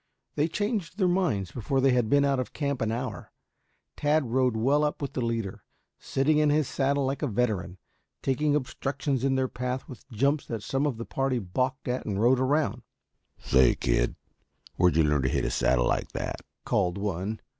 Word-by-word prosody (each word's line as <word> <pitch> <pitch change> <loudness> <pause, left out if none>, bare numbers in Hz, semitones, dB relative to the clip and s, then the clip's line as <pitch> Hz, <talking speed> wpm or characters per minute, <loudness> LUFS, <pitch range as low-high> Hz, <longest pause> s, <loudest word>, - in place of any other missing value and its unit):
They 150 +2 +1
changed 205 -1 -2
their 190 -4 +3
minds 175 - 0
before 130 +3 -1
they 135 0 +4
had 125 -3 +2
been 140 +2 +4
out 140 -2 +1
of 130 - -4
camp 140 -3 -2
an 110 -1 0
hour. 125 +3 -5 0.6
Tad 145 -4 +1
rode 125 -2 +2
well 140 +6 +3
up 150 - -1
with 140 - -4
the 130 - -2
leader, 115 -4 -3 0.4
sitting 150 +3 +1
in 150 -1 +3
his 150 -2 +2
saddle 140 0 0
like 135 +1 -2
a 150 - 0
veteran, 105 -6 -1 0.5
taking 145 +2 +1
obstructions 135 -1 -2
in 135 -1 +2
their 130 0 +1
path 125 +1 -4
with 130 - -12
jumps 140 +5 0
that 115 -3 -4
some 135 +6 0
of 130 -6 -2
the 115 - -5
party 135 -1 -1
balked 130 +7 -2
at 125 +1 -1
and 100 -2 -1
rode 125 +3 +4
around. 130 -3 +1 0.6
"Say, 65 -2 +4
kid, - - 0 0.6
where'd 90 -2 +3
you 80 - +5
learn 75 -2 +2
to 65 - +1
hit - - 0
a - - -1
saddle 60 -1 +2
like - - -1
that?" - - -3 0.3
called 90 -3 +1
one. 100 +1 -3
130 Hz, 195 wpm, -27 LUFS, 110-140 Hz, 0.6 s, you